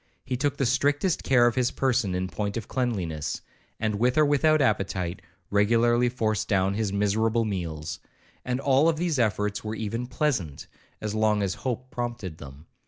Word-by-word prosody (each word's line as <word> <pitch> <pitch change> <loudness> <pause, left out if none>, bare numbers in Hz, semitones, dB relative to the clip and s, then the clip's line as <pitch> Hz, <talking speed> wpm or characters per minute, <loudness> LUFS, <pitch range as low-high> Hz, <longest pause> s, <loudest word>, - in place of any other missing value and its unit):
He 130 - -2
took 140 +2 -1
the 135 - +1
strictest 145 +8 +1
care 125 -3 +4
of 120 - +3
his 125 +1 +1
person 125 -8 0
in 90 +1 -1
point 100 +2 -3
of 115 - -5
cleanliness, 95 - -2 0.4
and 110 -2 -1
with 125 +3 +2
or 155 - +6
without 155 +2 +3
appetite, 95 -7 0 0.3
regularly 120 +4 +3
forced 110 -4 -1
down 95 -1 +2
his 105 -1 -1
miserable 110 +3 +1
meals; 85 -6 -4 0.4
and 125 0 -2
all 140 +4 +4
these 160 -3 -1
efforts 105 -2 0
were 110 0 -4
even 115 +3 -3
pleasant, 125 - -1 0.4
as 105 -1 -3
long 110 -1 +2
as 95 -2 0
hope 130 +3 -4
prompted 120 -9 -4
them. 70 +2 -11
110 Hz, 170 wpm, -26 LUFS, 100-125 Hz, 0.4 s, or